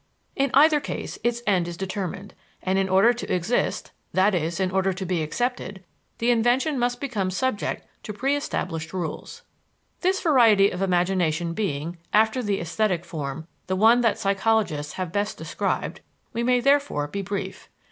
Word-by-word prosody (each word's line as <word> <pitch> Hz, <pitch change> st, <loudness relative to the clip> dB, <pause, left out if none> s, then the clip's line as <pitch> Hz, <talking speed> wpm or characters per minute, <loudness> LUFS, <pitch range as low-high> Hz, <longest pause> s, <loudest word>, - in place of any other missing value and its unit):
In 275 Hz, 0 st, +1 dB
either 300 Hz, +2 st, +6 dB
case -, -, -6 dB
its 240 Hz, 0 st, 0 dB
end 185 Hz, -4 st, +2 dB
is 170 Hz, -1 st, -6 dB
determined, 190 Hz, 0 st, -5 dB, 0.3 s
and 190 Hz, +1 st, +1 dB
in 190 Hz, 0 st, 0 dB
order 195 Hz, +6 st, +5 dB
to 240 Hz, -, -6 dB
exist, 180 Hz, +7 st, 0 dB, 0.2 s
i.e., 185 Hz, -4 st, +3 dB
in 190 Hz, -1 st, 0 dB
order 190 Hz, 0 st, +1 dB
to 190 Hz, +1 st, -5 dB
be 175 Hz, -2 st, 0 dB
accepted, 200 Hz, +2 st, -3 dB, 0.3 s
the 235 Hz, +2 st, +2 dB
invention 245 Hz, +5 st, +2 dB
must 245 Hz, 0 st, 0 dB
become 220 Hz, -9 st, -2 dB
subject 210 Hz, +3 st, -2 dB, 0.2 s
to -, -, -6 dB
preëstablished 205 Hz, -, -2 dB
rules. 185 Hz, -, -5 dB, 0.6 s
This 380 Hz, +1 st, +1 dB
variety 230 Hz, -, +5 dB
of 180 Hz, -, -5 dB
imagination 175 Hz, -3 st, +1 dB
being, 170 Hz, -4 st, -3 dB
after 220 Hz, +4 st, +3 dB
the 205 Hz, -4 st, -1 dB
esthetic 175 Hz, +1 st, -1 dB
form, 150 Hz, -1 st, -5 dB, 0.2 s
the 185 Hz, -, 0 dB
one 225 Hz, +5 st, +5 dB
that 230 Hz, -3 st, +2 dB
psychologists 195 Hz, -7 st, 0 dB
have 185 Hz, -3 st, -4 dB
best 205 Hz, +2 st, -1 dB
described, -, -, -3 dB, 0.3 s
we 235 Hz, -, -1 dB
may 250 Hz, +1 st, +2 dB
therefore 275 Hz, -, +2 dB
be 200 Hz, +7 st, -4 dB
brief. 195 Hz, 0 st, -5 dB
195 Hz, 155 wpm, -24 LUFS, 180-240 Hz, 0.6 s, either